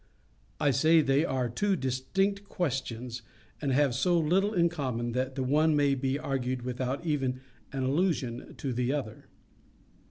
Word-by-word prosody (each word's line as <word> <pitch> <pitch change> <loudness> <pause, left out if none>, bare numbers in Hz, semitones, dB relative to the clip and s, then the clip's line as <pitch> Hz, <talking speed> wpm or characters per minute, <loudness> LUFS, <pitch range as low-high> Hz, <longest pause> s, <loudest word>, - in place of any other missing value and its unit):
I 145 - +3
say 160 +5 +5
they 140 +1 +2
are 130 -5 0
two 195 - 0
distinct 195 +10 -1
questions, 125 - -3 0.4
and 140 -3 0
have 135 -1 +3
so 170 +8 +2
little 185 +6 +2
in 175 -5 +3
common 130 -8 -2
that 130 +2 -2
the 130 - -1
one 150 +4 +3
may 145 -1 +3
be 135 0 0
argued 130 -3 -2
without 130 +4 -3
even 135 -5 -1 0.3
an 135 -1 -2
allusion 135 -4 -1
to 135 -3 -3
the 125 +1 0
other. 125 -7 -5
135 Hz, 155 wpm, -29 LUFS, 125-160 Hz, 0.4 s, say